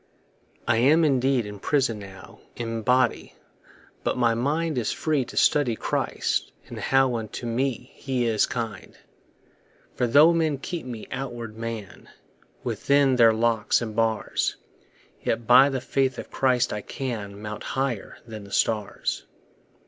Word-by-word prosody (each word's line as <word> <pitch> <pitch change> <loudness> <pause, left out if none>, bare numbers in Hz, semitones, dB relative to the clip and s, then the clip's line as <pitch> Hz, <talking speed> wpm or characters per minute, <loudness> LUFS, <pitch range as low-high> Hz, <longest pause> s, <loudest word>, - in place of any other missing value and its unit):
I 115 -1 +3
am 150 +7 +5
indeed 130 -3 +2
in 105 -1 -8
prison 130 -3 +1
now 95 -1 -12 0.2
In 115 -1 -4
body, 125 +3 +1 0.7
but - - -1
my 120 -2 +3
mind 145 +4 0
Is 115 - -1
free 150 -4 0
to - - -11
study 135 -6 +3
Christ, - - -1
and - - -8
how 135 -1 +2
Unto 115 +1 -5
me 125 +1 -2
he 130 -3 -2
is 110 -2 +2
kind. 110 -5 -5 1.0
For 125 - 0
tho' 150 +7 +6
men 160 -4 +1
keep 160 +1 -6
my 115 -3 -6
outward 120 -4 -5
man 115 -3 -7 0.5
Within 140 -2 +2
their 115 -2 +7
locks 115 -1 +2
and 110 -3 -5
bars, 115 -1 0 0.7
Yet 115 0 -1
by 130 +3 +7
the 135 -2 -2
faith 130 0 0
of - - -8
Christ 130 -2 +1
I 105 - -3
can 105 -5 -5
Mount 105 0 -6
higher 130 -6 -3
than 110 -3 -8
the 100 - -13
stars. 105 -1 -1
120 Hz, 145 wpm, -25 LUFS, 110-135 Hz, 1.0 s, their